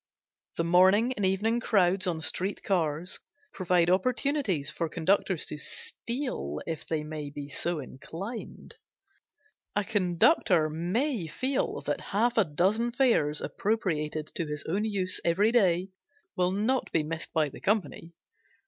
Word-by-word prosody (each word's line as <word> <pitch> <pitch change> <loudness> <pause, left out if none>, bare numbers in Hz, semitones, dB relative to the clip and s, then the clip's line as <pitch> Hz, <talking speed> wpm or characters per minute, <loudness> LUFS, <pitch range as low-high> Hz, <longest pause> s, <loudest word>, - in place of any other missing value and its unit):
The 165 - +1
morning 190 +8 +4
and 210 - -4
evening 205 +5 +1
crowds 190 -4 +2
on 165 -3 -1
street 185 +5 0
cars 170 -2 0 0.3
provide 180 -2 +2
opportunities 195 - +1
for 165 0 -3
conductors 180 +1 +1
to 150 - -3
steal, 235 - -4
if 165 -2 -5
they 155 -2 -1
may 150 -1 -6
be 145 0 -7
so 170 +3 -2
inclined. 170 - -8 1.0
A 205 - +2
conductor 180 - +3
may 185 - -1
feel 260 - -1
that - - -2
half 235 +4 0
a - - +6
dozen 190 +10 +1
fares 235 - +2
appropriated 155 -8 -2
to 165 - -2
his 150 -1 -4
own 200 +6 0
use 195 -4 0
every 200 +6 +3
day 190 -5 +3 0.5
will 180 -1 +2
not 220 +7 0
be 160 - +2
missed 160 +2 -5
by 155 -3 +1
the - - -12
company. 180 -4 -1
185 Hz, 140 wpm, -28 LUFS, 160-215 Hz, 1.0 s, a